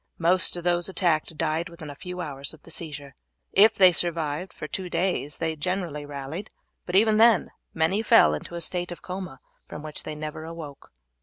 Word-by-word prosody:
Most 180 +3 +3
of 175 - -6
those 175 +1 +2
attacked 165 -4 0
died 160 +3 -1
within 160 -3 -9
a - - -10
few 180 +4 -6
hours 140 -1 -5
of 155 - -24
the - - -11
seizure. 145 -4 -6 0.4
If 210 +3 +7
they 185 -2 +7
survived 165 0 -1
for 155 - -7
two 185 +3 -4
days 175 -6 -1
they 160 -1 -1
generally 160 -2 -3
rallied, 145 +8 -6 0.4
but 180 - -2
even 215 +2 +5
then 225 -3 +5 0.2
many 165 +6 +2
fell 75 - +6
into 75 - -6
a 170 - -4
state 175 0 -2
of 175 - -8
coma 180 -7 -6 0.3
from 150 - -8
which 155 -1 -3
they 155 - -6
never 155 +1 -6
awoke. 160 -4 -9
165 Hz, 190 wpm, -26 LUFS, 150-180 Hz, 0.4 s, If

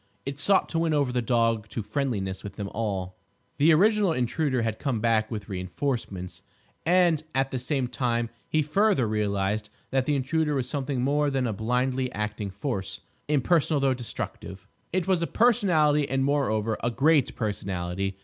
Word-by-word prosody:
It 140 0 -5
sought 195 +6 +3
to 165 - 0
win 165 -2 +1
over 140 -4 +1
the 125 0 0
dog 115 -2 +1
to 115 - -4
friendliness 100 -8 -2
with 100 -1 -7
them 100 -1 -4
all. 95 -5 -3 0.4
The 155 +4 +5
original 200 +2 +4
Intruder 130 0 0
had 110 -1 -2
come 130 -6 -1
back 110 -1 +2
with 110 -3 -5
reinforcements. 95 -2 -4 0.5
And 175 -3 +4
at 135 0 +1
the 130 - -2
same 130 0 -1
time 120 -2 -1 0.2
he 155 -1 +2
further 185 - +2
realised 105 0 -1 0.2
that 130 -1 +1
the 150 - +2
Intruder 150 +3 0
was 130 -3 -1
something 135 -3 -2
more 145 +2 +2
than 135 -2 0
a 115 - -1
blindly 125 +4 0
acting 105 -1 -3
force, 100 0 -4 0.3
impersonal 150 +1 +2
though 135 -1 +2
destructive. 100 -5 -6 0.2
It 185 -1 0
was 185 -3 +2
a 170 - 0
Personality, 160 - +3
and 135 0 +1
moreover 115 -6 +1
a 120 - +2
great 140 +3 +2
personality. 95 -3 -3
125 Hz, 170 wpm, -26 LUFS, 105-150 Hz, 0.5 s, The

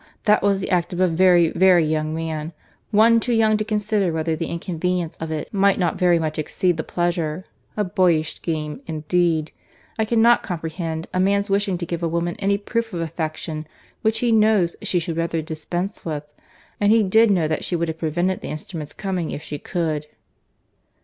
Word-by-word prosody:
That 210 -1 +4
was 200 -1 +2
the - - -4
act 180 -1 +1
of 175 - -4
a 185 - +4
very, 175 0 +4
very 180 -3 +4
young 155 0 -1
man, 160 0 -4 0.4
one 230 +2 +5
too 240 +1 -1
young 220 -1 +4
to 215 - -1
consider 210 -3 0
whether 160 0 -1
the 165 +1 -3
inconvenience 175 0 -2
of 160 - -5
it 155 +5 -5
might 200 -1 +3
not 175 -4 0
very 175 -2 +4
much 155 -1 -2
exceed 175 +3 0
the 160 - -2
pleasure. 175 0 -2 0.3
A 210 - +2
boyish 180 -5 +2
scheme, 155 - -4
indeed!—I 160 +5 -2
cannot 235 +1 +4
comprehend 165 -2 -4
a 185 - 0
man's 200 +2 +1
wishing 200 -2 +1
to 170 - -4
give 170 0 -4
a 170 - 0
woman 170 +1 -1
any 200 0 +1
proof 225 +1 -3
of - - -3
affection 160 -1 -4 0.3
which 220 0 +1
he 240 -1 +2
knows 215 -5 +3
she 180 - 0
would 165 -1 -4
rather 165 0 -1
dispense 175 +5 -4
with; 150 -3 -3 0.6
and 205 0 +3
he 225 -1 +5
did 220 +4 +4
know 175 -6 +2
that 155 - -2
she 180 - -1
would 170 0 0
have 160 0 -5
prevented 175 +4 -1
the - - -6
instrument's 155 0 -6
coming 185 -4 -3
if 150 - -5
she 145 - -6
could." 155 -4 -2
175 Hz, 190 wpm, -22 LUFS, 160-200 Hz, 0.6 s, one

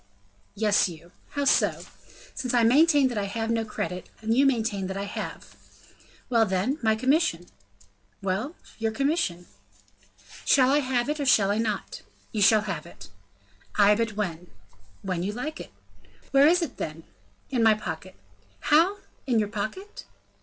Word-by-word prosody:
"Yes, 210 -2 +2
you." 170 +1 -12 0.2
"How 285 -1 -1
so?" - - +2 0.5
"Since 255 -1 -2
I 235 - +4
maintain 285 +3 +5
that 235 -4 -2
I 200 - -1
have 225 +3 -3
no 225 -1 +1
credit, 180 -4 -5
and 225 +1 -1
you 275 +2 +5
maintain 220 -7 -1
I 195 +1 -3
have." 200 - -7 0.7
"Well, 230 -2 +3
then, 195 +11 -1
my 220 -2 +2
commission?" 255 - +1 0.7
"Well, 195 - -2 0.2
your 225 0 0
commission?" 275 - -1 1.0
"Shall 260 -2 +4
I 290 - +4
have 255 -3 0
it, 300 +1 -2
or 285 - -1
shall 200 -5 +4
I 210 - 0
not?" 215 -3 -3 0.3
"You 215 - -2
shall 215 +2 +6
have 205 -2 -5
it." - - -13 0.7
"Ay, 205 0 +6
but 225 0 -1
when?" 180 -4 -4 0.6
"When 185 -3 -2
you 200 +4 -2
like." 295 - -6 0.6
"Where 275 +1 +6
is 350 +2 +4
it, 290 - -6
then?" 155 +1 -5 0.5
"In 250 -3 +1
my 220 -1 +5
pocket." 185 -2 -7 0.6
"How 340 +7 +5 0.3
in 245 -3 +2
your 210 -2 +1
pocket?" 230 - -6
225 Hz, 155 wpm, -26 LUFS, 200-270 Hz, 1.0 s, shall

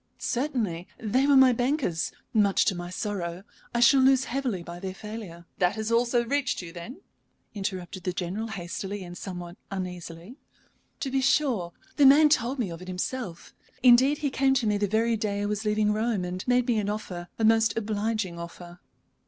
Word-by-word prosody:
"Certainly. 235 - -2
They 250 +5 +1
were 285 - +5
my 260 -1 +7
bankers, 245 - 0 0.2
much 205 -3 +3
to - - +2
my 175 -1 -6
sorrow. 185 -2 -4 0.3
I 235 - 0
shall 265 +3 +7
lose 265 0 +5
heavily 250 -9 -2
by 170 +1 -8
their 190 0 -5
failure." 210 -5 -8
"That 180 +3 +2
also 235 +1 +3
has - - -11
reached 280 -2 0
you, 175 -2 -7
then?" 235 - -9 0.5
interrupted 190 -3 -4
the 180 - -1
General, 185 +5 -3
hastily 195 0 -5
and 175 0 -9
somewhat 175 -2 -7
uneasily. 180 - -6 0.6
"To 270 - -2
be 270 0 +1
sure. 250 - +1 0.2
The 285 -2 +7
man 300 +3 +7
told 265 -2 +1
me 220 -8 -2
of 165 +1 -8
it 185 - -10
himself. 185 0 -5 0.3
Indeed, 260 +4 +6
he 285 -2 -2
came 270 0 +2
to 245 -3 +1
me 210 -1 +1
the 205 - +1
very 225 +3 +1
day 205 -2 -2
I - - 0
was 210 +1 -2
leaving 210 0 +2
Rome, 215 -3 0
and 180 +1 -4
made 250 0 +3
me 240 -3 +1
an 205 -1 -2
offer 185 -5 -5
a 225 - +1
most 225 -1 +3
obliging 215 -4 -2
offer." 175 +1 -9
210 Hz, 185 wpm, -27 LUFS, 180-245 Hz, 0.6 s, my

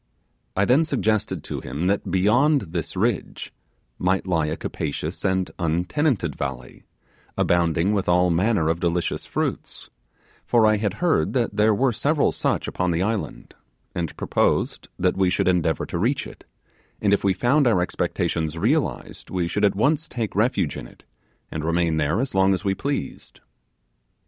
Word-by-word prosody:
I 95 - +2
then 130 +8 +4
suggested 110 -9 -1
to - - -5
him 70 +7 -4
that 100 +1 0
beyond 120 - +3
this 85 +1 -4
ridge 115 +3 -2 0.5
might 95 +1 +1
lie 80 -4 +1
a 75 - -3
capacious 75 +3 -4
and 95 -1 0
untenanted 90 - 0
valley, 60 -1 -6 0.5
abounding 85 +2 +2
with 100 -3 -1
all 90 0 +4
manner 90 -1 +2
of 80 +1 0
delicious 85 0 -1
fruits; - - -4 0.5
for 115 -2 +3
I 110 0 +4
had 105 -2 -1
heard 170 - +2
that 120 -5 0
there 105 0 +3
were 130 +4 +2
several 145 +6 +1
such - - -1
upon 90 0 -1
the 85 +1 +1
island, 110 +1 -3 0.4
and 85 -3 -4
proposed - - 0
that 90 +1 +1
we 95 -1 +3
should 90 - 0
endeavour 85 -3 +1
to - - -4
reach 125 +8 0
it, - - -12 0.5
and 100 -1 +2
if 100 - +1
we 100 - +3
found 125 +8 +2
our 110 -6 +3
expectations 80 -2 -1
realized 135 - -1
we 90 -2 -1
should 105 +4 -2
at 100 -2 +3
once 145 +9 +1
take 115 -4 -4
refuge 105 - +1
in - - -7
it - - -20 0.5
and 80 - -4
remain 85 0 +1
there 80 +6 +1
as 135 +2 -2
long 95 0 +4
as 95 - -7
we 95 - +2
pleased. 140 +7 -4
95 Hz, 165 wpm, -23 LUFS, 85-115 Hz, 0.5 s, then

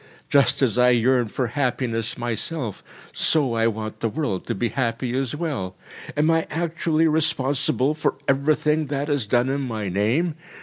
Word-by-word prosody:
Just 140 0 +4
as 125 -1 +2
I 125 0 +6
yearn 125 0 +3
for 125 +4 -2
happiness 120 -3 -1
myself, 120 - -3 0.3
so 145 -7 +2
I 115 0 +2
want 110 -1 -4
the 115 - 0
world 110 - -3
to - - -1
be 115 +4 -1
happy 120 +1 -2
as 135 +1 -1
well. 140 - -3 0.4
Am 155 +2 +3
I 165 0 +1
actually 165 0 0
responsible 150 -3 +1
for 155 - -1
everything 150 +2 +2
that 145 +1 -2
is 140 -7 0
done 120 +4 +2
in 140 +1 -1
my 110 -6 -3
name? 115 - +1
130 Hz, 165 wpm, -23 LUFS, 115-150 Hz, 0.4 s, I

